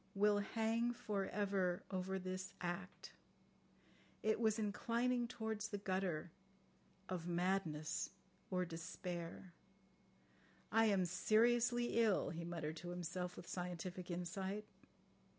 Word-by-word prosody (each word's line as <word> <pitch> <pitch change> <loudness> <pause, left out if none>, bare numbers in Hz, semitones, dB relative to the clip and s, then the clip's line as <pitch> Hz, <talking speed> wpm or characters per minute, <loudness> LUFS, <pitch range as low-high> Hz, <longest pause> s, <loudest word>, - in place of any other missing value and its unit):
"... - - -33
Will 210 -1 +6
hang 225 +3 +1
for 210 -5 -1
ever 195 -3 +1
over 190 0 -1
this 185 +1 -4
act.... 180 +1 -4 1.1
It 220 0 +3
was 220 -2 +3
inclining 235 +3 +1
towards 220 -2 -2
the 205 - -3
gutter... 185 -5 -1 0.8
of 175 -2 -3
madness 175 -3 0 0.4
or 180 -1 +1
despair." 170 +1 -5 1.2
"I 225 0 +6
am 195 -4 +4
seriously 235 +6 +4
ill," 215 -4 +3
he 170 0 -4
muttered 165 -2 -3
to 175 +3 -6
himself 180 +1 -3
with - - -7
scientific 180 0 -4
insight. 190 +4 -2
190 Hz, 115 wpm, -41 LUFS, 175-215 Hz, 1.2 s, Will